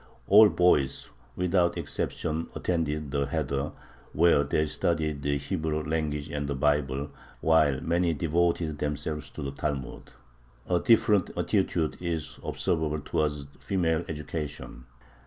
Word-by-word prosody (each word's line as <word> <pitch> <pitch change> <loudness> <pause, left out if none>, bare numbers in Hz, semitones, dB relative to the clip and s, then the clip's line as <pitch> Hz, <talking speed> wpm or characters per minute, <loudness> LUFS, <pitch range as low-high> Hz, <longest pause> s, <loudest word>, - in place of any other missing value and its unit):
All 105 - +8
boys, 90 -8 +2 0.2
without 90 -1 +1
exception, 80 0 -3
attended 75 -4 -1
the 70 -1 0
heder, 70 +1 -2 0.4
where 80 -2 +4
they 75 +2 +1
studied 75 -1 -1
the 70 0 0
Hebrew 75 +1 -2
language 75 -1 -2
and 75 -1 -3
the 70 - -2
Bible, 70 0 0 0.3
while 75 -4 +3
many 85 0 +1
devoted 85 -1 0
themselves 75 +1 -3
to 80 - -7
the 70 - -3
Talmud. 70 -2 -4 0.6
A 90 -1 +2
different 105 -4 +4
attitude 90 -2 0
is 85 -3 -3
observable 75 -2 -1
towards 75 -2 -1
female 85 -4 0
education. 75 -5 -6
75 Hz, 120 wpm, -28 LUFS, 75-85 Hz, 0.6 s, All